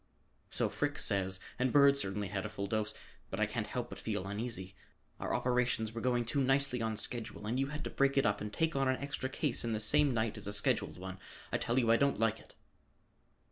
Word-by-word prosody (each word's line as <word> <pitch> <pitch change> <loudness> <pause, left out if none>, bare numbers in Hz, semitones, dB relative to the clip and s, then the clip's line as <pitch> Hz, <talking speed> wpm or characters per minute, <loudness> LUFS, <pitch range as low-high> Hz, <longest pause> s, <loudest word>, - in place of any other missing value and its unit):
"So - - 0
Frick - - -1
says, 95 -1 0 0.2
and 130 -1 +2
Bird 140 0 +7
certainly 100 -5 -2
had 95 0 -2
a 105 - -4
full 100 -1 -4
dose, 110 +1 -1 0.3
but - - -4
I - - +4
can't - - -3
help - - -3
but - - -8
feel 95 - -2
uneasy. 100 -2 -4 0.5
Our - - -3
operations 125 -3 +1
were 115 - -4
going 120 -1 +1
too 140 +5 +1
nicely 135 -2 +2
on 110 -1 -1
schedule 115 -3 -3
and 120 +4 -1
you 135 - +1
had 150 +1 -5
to - - -4
break 140 0 +2
it 135 - +4
up 105 -1 +1
and 105 0 -4
take 160 +8 0
on 135 -1 +2
an 130 0 +2
extra 140 -1 -3
case 135 -1 -1
in 115 -1 -1
the 110 - -1
same 145 +6 +4
night 110 -2 0
as - - -5
a 105 - 0
scheduled 100 - 0
one. 95 +1 -7 0.3
I - - +1
tell 120 +2 0
you, 115 -3 +4
I 115 - +6
don't 140 -4 +2
like 115 0 +2
it." - - -18
115 Hz, 235 wpm, -33 LUFS, 105-135 Hz, 0.5 s, Bird